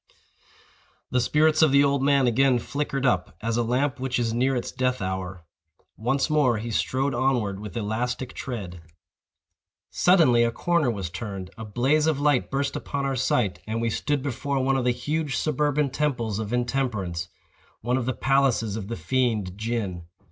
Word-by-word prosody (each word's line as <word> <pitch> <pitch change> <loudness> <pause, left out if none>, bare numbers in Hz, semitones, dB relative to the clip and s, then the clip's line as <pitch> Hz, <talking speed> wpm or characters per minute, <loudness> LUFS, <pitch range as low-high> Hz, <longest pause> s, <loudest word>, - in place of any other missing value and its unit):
The 125 - +2
spirits 155 +5 +3
of 155 -3 +5
the 140 +1 +6
old 140 -1 +2
man 140 -1 +3
again 125 +2 +3
flickered 140 +2 -3
up, 90 -9 0
as 115 0 -2
a 120 - +2
lamp 125 +4 0
which 130 0 -1
is 115 -2 0
near 130 +3 +1
its 120 - -3
death 130 0 0
hour. 95 -2 -4 0.5
Once 125 +5 0
more 145 -7 +2
he 115 +2 -4
strode 135 +5 0
onward 120 -6 0
with 105 -1 -7
elastic 120 +4 -2
tread. 95 -9 -6 1.1
Suddenly 160 -10 +4
a 115 - +2
corner 170 +3 +1
was 100 -7 -3
turned, 95 -2 -6
a 110 - -7
blaze 135 +9 +1
of 155 -3 +1
light 145 -3 +2
burst 140 +1 -1
upon 140 -1 -3
our 135 -1 -1
sight, 120 -7 0
and 110 +1 -2
we 115 0 0
stood 145 +3 -1
before 140 +1 -2
one 135 +1 +2
of 130 -2 0
the 125 - +4
huge 145 +4 -2
suburban 150 -1 0
temples 120 -8 -1
of 110 -1 -4
Intemperance—one 120 -2 -3
of 125 -2 -2
the 130 - +1
palaces 135 -7 +1
of 105 -3 -5
the 115 - -4
fiend, 115 -8 0
Gin. 105 -6 -3
125 Hz, 170 wpm, -25 LUFS, 110-140 Hz, 1.1 s, the